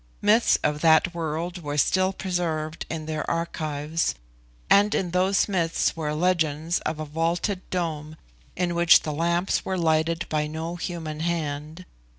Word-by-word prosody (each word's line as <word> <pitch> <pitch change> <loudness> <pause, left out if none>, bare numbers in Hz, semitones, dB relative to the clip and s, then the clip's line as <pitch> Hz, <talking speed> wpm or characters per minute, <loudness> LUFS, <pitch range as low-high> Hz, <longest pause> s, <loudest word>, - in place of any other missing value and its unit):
Myths 215 +3 +4
of 150 0 0
that 165 +2 +4
world 170 +2 -3
were 145 -1 -4
still 185 +5 +3
preserved 170 -4 -3
in 160 -1 -4
their 155 -1 -3
archives, 160 -1 -2 0.5
and 205 +1 +4
in 180 -3 -1
those 185 +2 +2
myths 170 -5 0
were 155 -2 -2
legends 165 -1 +1
of 155 0 -4
a 155 - -3
vaulted 170 +5 -1
dome 155 -4 -3 0.4
in 175 -1 -1
which 170 0 +6
the 155 - -3
lamps 170 +4 0
were 190 - -2
lighted 165 0 +1
by 150 -1 -1
no 160 +3 -5
human 165 -3 -5
hand. 160 0 -3
165 Hz, 150 wpm, -25 LUFS, 155-175 Hz, 0.5 s, which